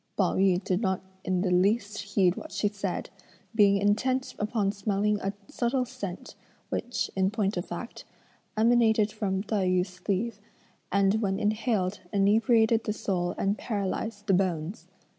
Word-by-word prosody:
Pao 190 -4 +2
yü 190 -1 +3
did 185 +2 0
not 190 -4 +1 0.2
in 185 -1 0
the 185 -1 0
least 205 +3 +2
heed 195 -3 +2
what 315 - -8
she 210 - 0
said, 205 -1 -4 0.4
being 200 -2 +5
intent 250 +6 +1
upon 210 -1 0
smelling 205 0 0
a 195 - -1 0.2
subtle 250 +1 0
scent 205 -8 -7 0.4
which, 245 - -2
in 190 0 +2
point 205 -2 -1
of 175 - -2
fact, 175 +7 -7 0.5
emanated 220 -2 +4
from 195 -3 -2
Tai 205 -3 0
yü's 185 +1 +2
sleeve, 200 +4 -2 0.5
and 200 +2 +3
when 195 -2 0
inhaled 210 -3 0
inebriated 220 +3 +3
the 210 - 0
soul 180 -4 -2
and 200 +2 0
paralysed 205 0 -3
the 200 - +2
bones. 180 +1 -1
205 Hz, 150 wpm, -28 LUFS, 190-220 Hz, 0.5 s, being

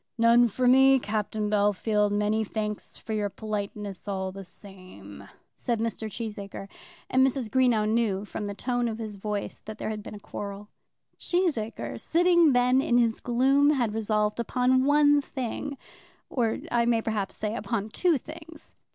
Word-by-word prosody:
"None 235 +1 +5
for 250 +3 0
me, 265 +1 +6
Captain 215 -2 -2
Bellfield; 210 0 +1
many 210 +2 +1
thanks 210 0 -5
for 220 - -6
your 210 -1 -1
politeness 205 -2 -5
all 190 -1 -2
the 195 +1 -9
same," 180 - -12 0.3
said 235 -2 -2
Mr. 225 -1 -3
Cheesacre; 205 -2 -6 0.4
and 260 0 +3
Mrs. 260 -4 0
Greenow 245 -5 +3
knew 215 -3 0
from 210 0 -5
the 200 - -5
tone 245 +1 -1
of 220 -1 -3
his 220 -2 -6
voice 205 0 -4
that 215 0 -7
there 215 - -3
had 210 -1 -5
been 210 - -9
a - - -9
quarrel. 205 0 -7 0.5
Cheesacre 320 - -1
sitting 345 -3 +4
then 250 +1 +4
in 240 -2 +2
his 230 -2 +2
gloom, 270 +4 +3
had 240 -7 0
resolved 210 0 0
upon 255 +2 +2
one 290 0 +5
thing, 275 +1 -5 0.5
or, 230 -4 0
I 235 -1 +2
may 230 -2 +2
perhaps 210 -3 -2
say, 215 +1 -3
upon 220 -3 -3
two 340 +7 +2
things. 315 +3 -12
220 Hz, 160 wpm, -27 LUFS, 210-255 Hz, 0.5 s, me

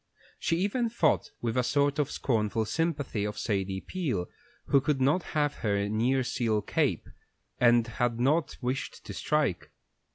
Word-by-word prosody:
She 165 - 0
even 215 +6 0
thought 175 -9 +1
with 115 -2 -1
a 125 - +3
sort 145 +2 +1
of 145 - +1
scornful 110 -2 0
sympathy 145 -5 -1
of 105 0 -3
Sadie 95 -2 -1
Peel, 140 - -2 0.4
who 140 - +4
could 145 -1 0
not 145 +7 +3 0.2
have 145 -1 +1
her 100 -2 0
nearseal 115 -1 +1
cape, - - 0 0.5
and 120 -1 +5
had 120 0 -1
not 150 +6 +1
wished 130 +1 -3
to - - -6
strike. 150 - 0
125 Hz, 150 wpm, -29 LUFS, 110-150 Hz, 0.5 s, and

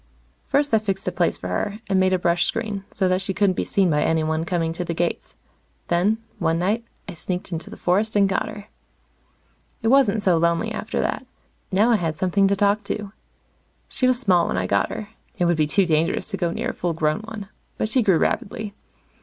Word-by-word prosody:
First 285 -1 +1
I 220 - +6
fixed 195 -3 -3
a - - +1
place 175 -2 0
for 90 - -6
her, 200 - -2
and 195 -2 +2
made 185 0 +3
a 185 - +3
brush 175 -1 +2
screen, 215 -4 -3
so 190 - 0
that 185 +1 +1
she 195 -1 -3
couldn't 200 -2 +3
be - - -1
seen 190 -4 +2
by 150 -1 +2
anyone 160 0 +1
coming 165 -2 -1
to 180 - -3
the 170 -1 -3
gates. 170 +1 -2 0.5
Then, 185 +6 +2 0.2
one 165 -2 +1
night, 205 +7 0 0.2
I 190 - -6
sneaked 180 +2 -5
into 165 -1 -5
the - - -10
forest 205 +5 +1
and 200 -1 +5
got 195 - -1
her. 205 -1 -9 1.2
It 225 - +2
wasn't 230 -6 +4
so 180 -3 +4
lonely 170 0 +1
after - - -3
that. - - -2 0.4
Now 210 +5 +4
I 230 - +5
had 160 -5 -2
something 190 +3 +2
to 200 - +2
talk 205 +1 +2
to. 205 -1 -4 0.8
She 255 - +1
was 255 -1 +2
small 180 -8 +3
when - - -1
I 95 - 0
got 100 +2 +1
her 215 - -6 0.3
it 175 - +2
would 175 0 +3
be 155 -1 +1
too 195 +5 +3
dangerous 165 +1 +1
to 205 - -2
go 175 -3 0
near - - -2
a - - -4
full 175 -1 -2
grown 155 -1 0
one 215 -2 -8 0.3
but - - 0
she 255 +4 +2
grew 195 -6 +4
rapidly. 205 +5 -1
190 Hz, 220 wpm, -23 LUFS, 170-210 Hz, 1.2 s, I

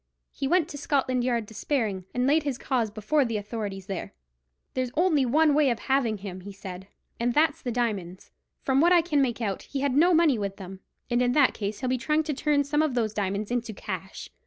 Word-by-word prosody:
He 270 - -3
went 340 +1 +3
to 290 - -7
Scotland 260 -4 0
Yard 240 -3 0
despairing, 215 -4 -2
and 250 0 0
laid 295 +4 +4
his 285 -4 -3
case 250 -5 0
before 215 +8 +1
the 230 -4 -2
authorities 205 -2 -5
there. 195 -2 -5 0.6
"There's 255 -1 -1
only 310 -6 +3
one 305 +4 +4
way 290 -1 +4
of 235 - 0
having 255 -4 0
him," 190 -2 -7
he 200 +2 -8
said, 190 -1 -9 0.3
"and 235 +1 0
that's 310 +1 +3
the 245 - -3
diamonds. 205 -7 -3 0.3
From 270 +1 +2
what 345 +2 +5
I 345 -2 +6
can 300 -4 +1
make 245 -3 -1
out, 200 -4 -2
he 275 - -5
had 280 -2 +1
no 340 +5 +5
money 320 -8 +4
with 200 -1 -3
him, 190 -1 -9 0.3
and 240 +1 +2
in 245 0 +2
that 280 -2 +4
case 205 +2 -4
he'll 255 - -1
be 255 0 0
trying 305 +5 +1
to 305 -1 -2
turn 290 +1 +1
some 295 +2 +1
of 305 -5 0
those 220 -3 0
diamonds 200 +1 -2
into 235 -2 -2
cash." 190 -1 -6
245 Hz, 225 wpm, -26 LUFS, 210-290 Hz, 0.6 s, I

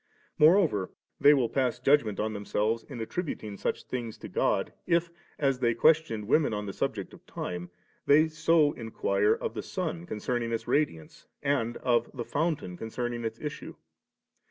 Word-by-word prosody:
More 160 +5 +8
over, 120 - +1 0.3
they 145 - +7
will 135 -5 +3
pass 125 -1 0
judgment 130 -6 +3
on 110 +1 -1
themselves 105 +2 -1
in 130 -5 -9
attributing 115 - -4
3 100 - -8
such - - -2
things 120 -3 -5
to - - -8
God, - - 0
if, 170 -1 +2 0.3
as 135 -3 +1
they 120 -2 +2
questioned 155 -7 +3
women 145 -3 +3
on 105 0 -3
the 100 - -5
subject - - -3
of - - -15
time, 90 0 -5 0.6
so 160 -1 +3
they - - -11
inquire 105 -2 +1
of - - -4
the - - -4
sun 85 0 -4
concerning 115 +2 -2
its 115 - -1
radi 145 - +1
ance, 80 - -17 0.2
and 140 -5 0
of 120 -2 +1
the 120 -2 -4
fountain 145 - -2
concerning 120 +2 -4
its 115 0 -4
issue. 150 -1 -6
120 Hz, 175 wpm, -29 LUFS, 110-145 Hz, 0.6 s, More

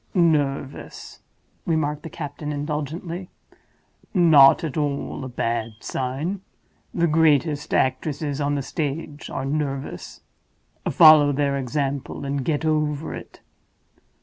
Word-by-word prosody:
"Nervous," 145 -5 -1 0.4
remarked 150 -3 -1
the 165 - -8
captain, 150 -1 -6
indulgently. 155 +5 -4 0.9
"Not 160 -7 +7
at 155 -5 -3
all 145 -2 -2
a 130 - -5
bad 115 -2 -2
sign. 145 +10 -3 0.5
The 170 - +1
greatest 155 -2 +2
actresses 145 +2 0
on 145 0 0
the 140 - -2
stage 150 0 -4
are 135 - -4
nervous. 135 -8 -4 0.7
Follow 155 -3 +7
their 140 0 0
example, 140 +1 -3
and 140 -1 -2
get 150 +3 -1
over 150 -1 0
it. - - -10
145 Hz, 110 wpm, -23 LUFS, 140-155 Hz, 0.9 s, Not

